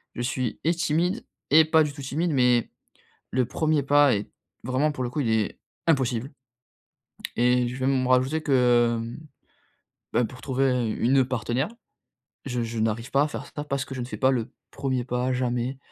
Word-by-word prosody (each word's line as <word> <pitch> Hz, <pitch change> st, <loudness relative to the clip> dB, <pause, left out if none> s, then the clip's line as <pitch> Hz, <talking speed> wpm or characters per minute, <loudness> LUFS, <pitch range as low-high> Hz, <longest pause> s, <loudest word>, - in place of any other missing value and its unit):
Je 120 Hz, -, -4 dB
suis 130 Hz, -1 st, -2 dB
et 165 Hz, +3 st, +3 dB
timide 170 Hz, +6 st, 0 dB, 0.3 s
et 155 Hz, +2 st, +7 dB
pas 160 Hz, 0 st, +4 dB
du 145 Hz, -1 st, -3 dB
tout 145 Hz, -, -9 dB
timide, 155 Hz, +6 st, -1 dB
mais 125 Hz, -4 st, +3 dB, 0.6 s
le 130 Hz, 0 st, +1 dB
1er 155 Hz, +1 st, 0 dB
pas 145 Hz, -1 st, +5 dB
est 100 Hz, -, -5 dB, 0.4 s
vraiment, 130 Hz, +5 st, +1 dB
pour 130 Hz, -4 st, -3 dB
le 120 Hz, -, -3 dB
coup, 145 Hz, -, -2 dB
il 115 Hz, -, 0 dB
est 110 Hz, -2 st, +1 dB, 0.3 s
impossible 130 Hz, -5 st, +1 dB, 1.1 s
et 125 Hz, +1 st, +3 dB
je 125 Hz, -, -6 dB
vais 130 Hz, 0 st, -1 dB
même 130 Hz, -1 st, +2 dB
rajouter 130 Hz, +5 st, +2 dB
que, 120 Hz, -4 st, +3 dB
hem, 115 Hz, +1 st, -6 dB, 1.0 s
bah, 120 Hz, -, +2 dB
pour 125 Hz, +3 st, -8 dB
trouver 130 Hz, -3 st, +1 dB
une 130 Hz, +2 st, +3 dB
partenaire, 125 Hz, +2 st, -1 dB, 0.8 s
je 125 Hz, -3 st, -2 dB
je 115 Hz, 0 st, -4 dB
n'arrive 115 Hz, +3 st, -1 dB
pas 140 Hz, +1 st, +4 dB
à -, -, +1 dB
faire -, -, -6 dB
ça, 150 Hz, -, -4 dB
parce 140 Hz, -2 st, -1 dB
que 135 Hz, -, -8 dB
je -, -, -5 dB
ne -, -, -3 dB
fais 125 Hz, -, -6 dB
pas 130 Hz, 0 st, +3 dB
le 120 Hz, -4 st, -2 dB, 0.2 s
1er, 125 Hz, -1 st, -1 dB
jamais. 125 Hz, +1 st, -1 dB
130 Hz, 185 wpm, -25 LUFS, 120-140 Hz, 1.1 s, et